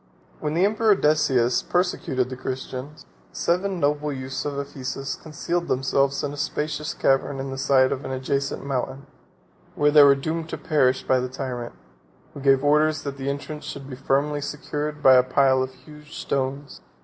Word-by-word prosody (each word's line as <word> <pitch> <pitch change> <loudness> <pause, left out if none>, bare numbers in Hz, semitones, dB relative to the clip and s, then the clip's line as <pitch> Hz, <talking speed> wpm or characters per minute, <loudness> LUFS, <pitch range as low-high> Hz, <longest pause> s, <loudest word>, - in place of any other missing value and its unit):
44 - - -16
When 150 0 -1
the 180 +3 +4
emperor 215 0 +3
Decius 140 -7 +2
persecuted 135 -8 -1
the - - -4
Christians, 130 +2 -6 0.3
seven 185 +2 0
noble 150 0 0
youths 130 -1 -5
of 145 -1 -3
Ephesus 135 -1 -4
concealed 170 +3 -3
themselves 135 +1 +1
in 145 0 -2
a - - -8
spacious 150 +1 -3
cavern 135 +1 +1
in 135 0 -4
the 135 - -5
side 135 -1 +4
of 130 - -3
an - - -5
adjacent 135 +1 -2
mountain; 135 0 -3 0.7
where 150 0 +3
they 150 0 +8
were 140 -1 +7
doomed 160 +4 -3
to - - -4
perish 135 -6 +2
by 130 - +2
the 125 0 -3
tyrant, 125 -2 -5 0.6
who - - -8
gave 135 -1 +3
orders 150 +1 +3
that 140 -1 -5
the 135 0 -3
entrance 150 +2 -5
should 140 -1 -7
be 130 - -7
firmly 140 +3 0
secured 150 +1 -4
by 130 - +8
the 130 - +8
a - - +4
pile 130 0 +3
of 130 0 -2
huge 150 +3 -13
stones. 140 +1 -3
140 Hz, 185 wpm, -24 LUFS, 130-150 Hz, 0.7 s, they